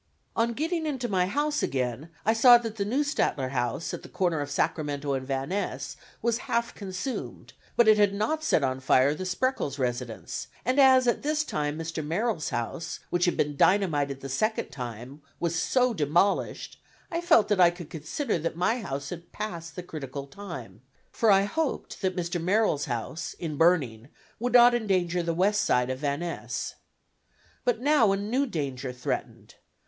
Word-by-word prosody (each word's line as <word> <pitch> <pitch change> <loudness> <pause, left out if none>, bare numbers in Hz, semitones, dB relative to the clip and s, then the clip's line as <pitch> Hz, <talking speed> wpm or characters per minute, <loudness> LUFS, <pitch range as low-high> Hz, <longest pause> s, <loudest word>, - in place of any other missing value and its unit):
On 235 +1 +1
getting 320 +4 -1
into 260 -5 -2
my 185 -4 +1
house 295 +7 0
again, 130 +3 -2 0.2
I 220 - +4
saw 240 +1 +8
that 225 -2 -6
the 200 - -1
Neustadter 250 - 0
house, 125 +4 -2
at - - -5
the - - -12
corner 175 -5 0
of 145 - -4
Sacramento 145 -1 -1
and 130 -1 -3
Van 135 +1 -2
Ness, 140 -9 -3 0.3
was 235 0 +1
half 235 0 0
consumed, 200 +6 -6 0.2
but 235 - +5
it 215 -1 +6
had 205 -1 +5
not 220 +11 -1
set 165 - +2
on 130 -1 0
fire 130 +2 +4
the 185 +5 -5
Spreckels 185 - -1
residence, 125 -3 -3 0.2
and 255 +4 +2
as 260 -2 +6
at 240 - +2
this 305 +1 0
time 150 - -2
Mr. 165 -1 -4
Merrill's 170 +3 -1
house, 120 +6 -4
which 175 +1 +2
had 175 - 0
been 145 0 0
dynamited 145 -7 +2
the 135 - -5
second 215 - 0
time, 125 +2 -7 0.2
was 170 -1 -1
so 250 +8 +2
demolished, 170 +3 0 0.3
I 335 0 -1
felt 335 -11 +5
that 205 -3 +3
I 175 - +8
could 175 -2 -9
consider 165 - -2
that 165 +1 -3
my 220 +8 +1
house 140 -6 -5
had 170 -1 -8
passed 170 -6 -6
the 180 - -5
critical 140 -4 -6
time, 135 - -9 0.3
for 225 - +2
I 195 -1 +6
hoped 310 +9 -3
that 185 -2 0
Mr. 175 -1 -2
Merrill's 185 -4 +2
house 125 +5 -4
in 160 -3 -4
burning 140 -9 +2 0.3
would 245 +2 -1
not 245 0 +8
endanger 185 -6 +1
the 170 -1 -2
west 205 +4 +2
side 125 +1 +2
of 130 - -4
Van 145 +1 -1
Ness. 175 -1 -4 0.9
But 245 -2 +1
now 265 -7 +4
a 195 - +1
new 240 +8 0
danger 135 - -3
threatened. 125 0 -5
175 Hz, 180 wpm, -27 LUFS, 140-225 Hz, 0.9 s, saw